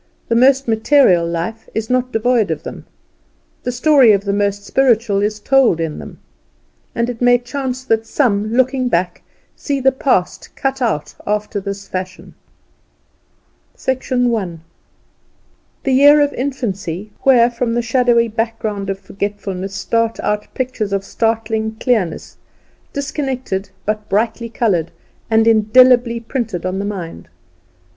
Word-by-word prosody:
The 230 - +2
most 265 +2 +4
material 220 -6 +3
life 175 +7 -4
is 220 0 -2
not 255 +1 0
devoid 225 -1 +1
of - - -3
them; - - -8 0.8
the 245 - -3
story 250 -2 +5
of 200 0 0
the 200 - 0
most 200 0 -1
spiritual 230 -6 +2
is 210 +1 -1
told 255 -6 +3
in 160 -2 -3
them. - - -10 0.8
And 235 0 0
it 245 -1 -6
may 245 0 +5
chance 260 +1 -5
that 225 -3 0
some, 215 -5 0
looking 255 +1 +1
back, 175 -1 -1 0.3
see 280 -2 -2
the 265 0 +3
past 260 -8 -1
cut 270 0 -2
out 150 -12 -1
after 210 0 -1
this 200 0 -6
fashion: 185 0 -6 1.5
I. 245 -6 0 1.3
The 270 - +1
year 290 +3 +7
of 290 0 +2
infancy, 210 - -4
where 245 -3 +5
from 235 -1 -2
the 240 - 0
shadowy 235 -1 +2
background 220 -3 -3
of 195 - -2
forgetfulness 195 -1 -5
start 230 +1 -1
out 210 0 -2
pictures 245 -6 -2
of 195 -1 -1
startling 220 0 -1
clearness, 220 -7 -1 0.5
disconnected, 265 -8 -3 0.2
but 210 0 -3
brightly 225 +3 -1
coloured, 195 -8 0 0.4
and 225 0 +3
indelibly 235 +2 +4
printed 225 -6 -4
in 185 +1 -2
the 200 - -3
mind. 170 - -6
225 Hz, 135 wpm, -17 LUFS, 200-255 Hz, 1.5 s, year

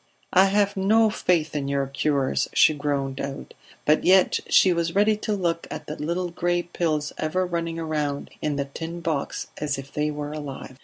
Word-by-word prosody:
"I 185 +1 +7
have 200 +1 +2
no 215 +3 +4
faith 165 -6 0
in 140 -2 -1
your 140 0 0
cures," 140 0 0
she 155 - +6
groaned 140 -2 -2
out. 140 0 -6 0.3
But 150 +1 +3
yet 185 0 +5
she 185 - +5
was 170 0 -1
ready 210 +2 +4
to 215 0 -2
look 170 -4 -1
at - - -6
the 150 - -5
little 170 +4 -2
gray 175 +1 0
pills 155 -4 -2
ever 185 +4 0
running 170 -2 -3
round 150 -3 -2
in 150 -1 -1
the 140 0 -1
tin 165 +5 -7
box 160 -4 -3
as 145 -2 -1
if 135 +1 -9
they 150 0 0
were 150 0 -4
alive. 140 -3 -7
155 Hz, 190 wpm, -24 LUFS, 145-175 Hz, 0.3 s, I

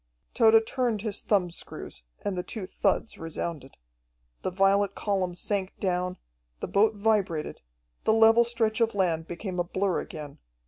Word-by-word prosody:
Tode 225 -1 +6
turned 235 -4 -1
his 215 -3 -3
thumbscrews, 180 - -2 0.2
and 200 - -1
the 180 - -1
two 200 +2 -5
thuds 225 - -1
resounded. 165 -3 -5 0.6
The - - -1
violet 195 +1 +2
column 190 -4 -1
sank 195 +1 -2
down, 180 -1 -1 0.4
the - - -3
boat 215 +2 +3
vibrated, 200 -7 0 0.4
the 220 - +4
level 225 +1 +6
stretch 230 -1 0
of 230 -2 +2
land 170 -4 0
became 180 +1 -5
a - - +3
blur 185 +1 0
again. 150 -3 -8
195 Hz, 145 wpm, -27 LUFS, 180-220 Hz, 0.6 s, Tode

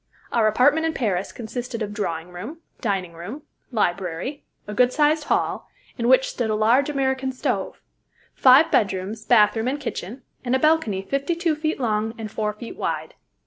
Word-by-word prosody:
Our 225 -2 +3
apartment 285 +9 +3
in 320 - -1
Paris 195 -6 -1
consisted 235 0 -5
of 205 -1 -5
drawing 170 -5 -3
room, 225 - -8 0.2
dining 195 -6 -2
room, 200 - -8 0.3
library, 195 - -2 0.2
a 210 - -6
good 250 +4 +4
sized 300 +2 +2
hall, - - 0 0.3
in 235 -1 -1
which 260 +1 +5
stood 235 -3 -2
a 215 - +1
large 235 +7 +3
American 265 -2 0
stove, 255 - -3 0.5
five 265 +5 +6
bedrooms, 200 +2 0
bathroom, 225 0 +4
and 280 +3 -1
kitchen, 245 -3 -6 0.2
and 250 0 +1
a - - +2
balcony 305 -11 +2
fifty 275 - -1
two 335 -2 0
feet 310 0 -2
long 220 -2 -1
and 220 -2 -6
four 215 -1 -1
feet 215 +2 -9
wide. - - -3
235 Hz, 170 wpm, -23 LUFS, 210-275 Hz, 0.5 s, five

